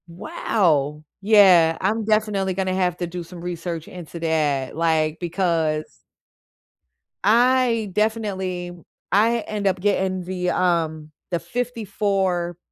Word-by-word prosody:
Wow! 165 - 0 0.2
Yeah, 190 -6 +6
I'm 215 +4 0
definitely 210 -3 +1
gonna 190 0 -1
have 180 -2 0
to 175 - -3
do 175 +1 -6
some 170 +1 -11
research 170 -2 -5
into 175 -1 -9
that, 150 -5 0
like, 160 -1 +1
because 165 - -1 1.2
I 235 0 +3
definitely 190 -5 -2 0.4
I 225 +4 +3
end 210 -2 -3
up 190 -1 +1
getting 190 -1 0
the, 180 0 -2
um, 160 -4 0 0.2
the 175 - 0
54, 195 -7 -2
180 Hz, 115 wpm, -22 LUFS, 165-205 Hz, 1.2 s, Yeah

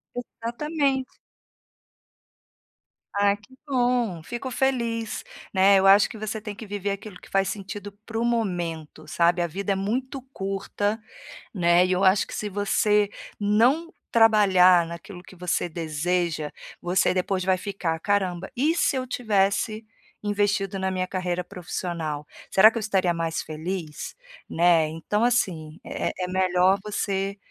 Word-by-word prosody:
Exatamente. 265 +3 -2 2.0
Ah, 200 0 +3
que 210 +5 -21
bom, 245 - +1
fico 240 +5 -5
feliz, 235 -4 -1 0.3
né, 195 +1 +6
eu 190 - +3
acho 200 +1 +7
que 225 - -9
você 215 0 -4
tem 210 -1 -6
que 225 +1 -9
viver 205 0 -3
aquilo 200 -1 -6
que - - -16
faz 195 0 +2
sentido 205 +1 -6 0.2
para 225 0 -4
o 235 - +1
momento, 175 -9 -2
sabe, 170 +1 +2
a 175 - +2
vida 195 +4 -3
é - - -2
muito 250 +8 -2
curta, 195 +2 -2 0.5
né, 175 -2 +4
e 185 - -1
eu 185 +2 +2
acho 190 +2 +5
que - - -12
se 210 - -3
você 205 +1 +2 0.3
não 245 +11 +3 0.2
trabalhar 190 -6 +6
naquilo 175 +2 -9
que 190 - -14
você 180 0 -1
deseja, 160 -1 -1 0.3
você 180 +2 +2
depois 185 0 -1
vai 190 -1 +3
ficar: 180 -4 -3
"Caramba, 190 -1 0
e 295 +7 +2
se 285 - +2
eu 255 -1 -2
tivesse 215 -1 0 0.4
investido 205 -1 0
na 190 0 -1
minha 185 -1 -1
carreira 180 -1 -2
profissional, 170 -4 -4 0.2
será 215 +3 +7
que 230 - -4
eu - - -3
estaria 190 -4 +1
mais 165 -1 -2
feliz?", 160 0 -5 0.3
né, 170 -1 +4
então, 165 +8 -1
assim, 170 -10 0
é - - -2
é 180 -1 -3
melhor 185 +1 +3
você, 200 -1 -2
195 Hz, 145 wpm, -25 LUFS, 180-215 Hz, 2.0 s, acho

